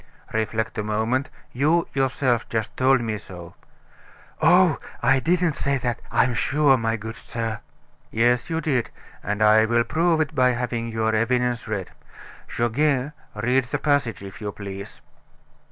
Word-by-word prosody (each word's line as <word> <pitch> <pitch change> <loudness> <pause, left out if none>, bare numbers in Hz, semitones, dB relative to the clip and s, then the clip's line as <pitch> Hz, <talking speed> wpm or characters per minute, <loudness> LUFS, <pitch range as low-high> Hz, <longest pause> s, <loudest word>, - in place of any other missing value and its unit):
"Reflect 110 0 -1
a - - -1
moment; 110 +5 -1 0.2
you, 155 +6 +2
yourself 130 -3 0
just 110 -1 -3
told 130 0 +3
me 110 -2 -3
so." 90 -4 -11 0.9
"Oh, 175 -2 +5 0.2
I 130 +2 +4
didn't 170 +2 +1
say 140 0 0
that, 120 -2 -2
I'm 125 0 +3
sure, 135 +3 +3
my 115 -2 0
good 110 +1 -7
sir." 115 -2 -4 0.5
"Yes, 120 +4 +1
you 165 0 -1
did, 135 -7 0 0.3
and 105 +2 -1
I 110 +1 +6
will 120 +1 +2
prove 165 +4 +1
it 155 -1 0
by 125 -3 +3
having 120 -1 -2
your 110 -1 -1
evidence 120 +1 0
read. 100 -4 -4 0.6
Goguet, 135 +3 0 0.2
read 125 +2 +1
the 130 +4 -2
passage, 140 -8 0
if 95 +2 -10
you 105 -1 -3
please." 100 -1 -8
120 Hz, 150 wpm, -23 LUFS, 110-140 Hz, 0.9 s, I